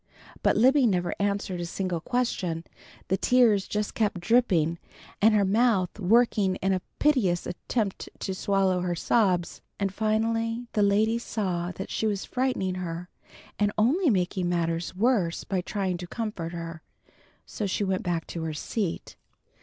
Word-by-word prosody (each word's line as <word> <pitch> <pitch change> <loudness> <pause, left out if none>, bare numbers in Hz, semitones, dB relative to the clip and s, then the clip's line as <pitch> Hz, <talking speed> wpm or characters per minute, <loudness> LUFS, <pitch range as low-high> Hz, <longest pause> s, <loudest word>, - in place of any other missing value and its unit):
But - - +3
Libby 260 +3 +5
never 180 -4 0
answered 200 -3 -1
a - - -2
single 180 -2 -3
question. 185 -9 -1 0.5
The 190 - +2
tears 225 -6 +3
just 210 0 -2
kept 210 -5 0
dripping 175 -6 +2 0.4
and 215 +1 +5
her 205 -1 +4
mouth 210 -2 +2
working 210 -1 +3
in 190 +1 0
a 185 - -1 0.2
piteous 225 - +2
attempt 205 +2 -3
to 190 - -3
swallow 190 -1 +1
her 180 -1 -1
sobs, 180 -2 +1 0.2
and 195 -1 -1
finally 225 +2 0
the 210 - +2
lady 215 +3 +3
saw 185 -7 -2
that 190 - -7
she 220 - 0
was 200 -2 -2
frightening 250 -8 -1
her, 175 0 -5 0.5
and 205 0 +2
only 285 - +3
making 185 -3 0
matters 170 0 -1
worse 195 -5 +1
by 190 -2 -1
trying 190 -1 -2
to 175 0 -7
comfort 210 -6 -4
her, 165 -2 -6 0.6
so 210 - -4
she 195 - -1
went 190 -1 0
back 170 -2 -2
to 170 - -6
her 160 -1 -3
seat. 190 +3 -3
195 Hz, 155 wpm, -27 LUFS, 175-220 Hz, 0.6 s, Libby